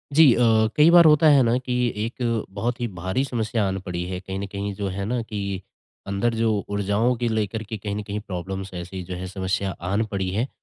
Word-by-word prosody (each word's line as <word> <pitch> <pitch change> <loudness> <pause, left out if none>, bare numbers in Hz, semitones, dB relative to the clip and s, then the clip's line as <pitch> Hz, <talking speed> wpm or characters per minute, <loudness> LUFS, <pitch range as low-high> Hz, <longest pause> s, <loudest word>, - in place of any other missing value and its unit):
जी 155 -6 +8
अ, - - -1 0.4
कई 150 +2 +6
बार 170 -1 +8
होता 155 +1 +6
है 140 -2 +6
ना 120 +1 +2
कि 125 -1 -4 0.3
एक 115 -2 -2
बहुत 115 +5 -2
ही 120 - 0
भारी 95 +9 0
समस्या 110 -4 -1
आन 95 - -2
पड़ी 90 -2 -4
है। 90 -1 -3
कहीं 95 0 -6
न 100 - -3
कहीं 100 0 -3
जो 100 0 -3
है 95 +1 -4
ना 120 +3 -1
कि 100 -4 -4 0.5
अंदर 100 +4 0
जो 115 -1 +2 0.2
ऊर्जाओं 100 +4 +1
को 120 0 -3
लेकर 110 0 -1
के 110 +1 -6
कहीं 100 0 -4
न 105 - -3
कहीं 105 0 -4
प्रॉब्लम्स 95 -1 -6
ऐसी 90 +1 -6
जो 90 +1 -6
है, 90 +1 -5
समस्या 95 +1 -2 0.2
आन 100 +3 +1
पड़ी 95 -2 -1
है। 110 +7 -1
100 Hz, 225 wpm, -24 LUFS, 95-120 Hz, 0.5 s, जी